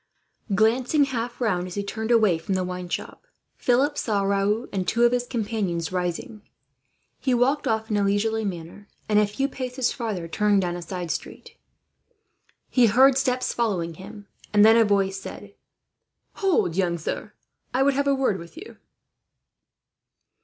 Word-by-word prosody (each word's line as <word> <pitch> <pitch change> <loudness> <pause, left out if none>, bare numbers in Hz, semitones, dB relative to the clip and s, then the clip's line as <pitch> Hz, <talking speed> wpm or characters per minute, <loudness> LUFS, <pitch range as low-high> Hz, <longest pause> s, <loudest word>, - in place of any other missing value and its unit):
Glancing 245 +7 +3
half 240 -3 -4
round, 185 -7 0
as 180 - -8
he 200 - -2
turned 220 +2 -4
away 215 -8 +4
from 190 +4 -2
the 185 - 0
wine 180 0 -5
shop, - - -6 0.3
Philip 275 +4 +1
saw 205 -3 0
Raoul 200 +4 0
and 185 -2 -2
two 235 +5 +2
of 240 - +5
his 245 0 -1
companions 205 -8 -2
rising. 180 +4 -3 0.8
He 260 -2 +1
walked 265 +5 +1
off 220 0 -1
in 210 - +2
a 205 - +2
leisurely 220 +3 +1
manner 185 +1 -6 0.2
and, 210 -1 +4
a 210 - +3
few 270 +7 -1
paces 255 -2 -2
farther, 210 -9 -4
turned 205 +3 +2
down 175 -1 -2
a 175 - -6
side 175 -1 -5
street. - - -7 1.1
He 245 -3 +4
heard 260 +5 +5
steps 255 -1 0
following 185 -8 -1
him, 205 +4 -11 0.3
and 210 0 +6
then 225 +1 +7
a 230 -1 +5
voice 195 -2 +1
said: - - -9 0.8
"Hold, 365 - +1
young 180 -2 +1
sir. 160 - -5 0.4
I 260 +2 +2
would 280 0 +3
have 280 +1 0
a 280 - +3
word 260 -8 0
with 170 - -12
you." 400 +7 -11
215 Hz, 165 wpm, -24 LUFS, 190-245 Hz, 1.1 s, then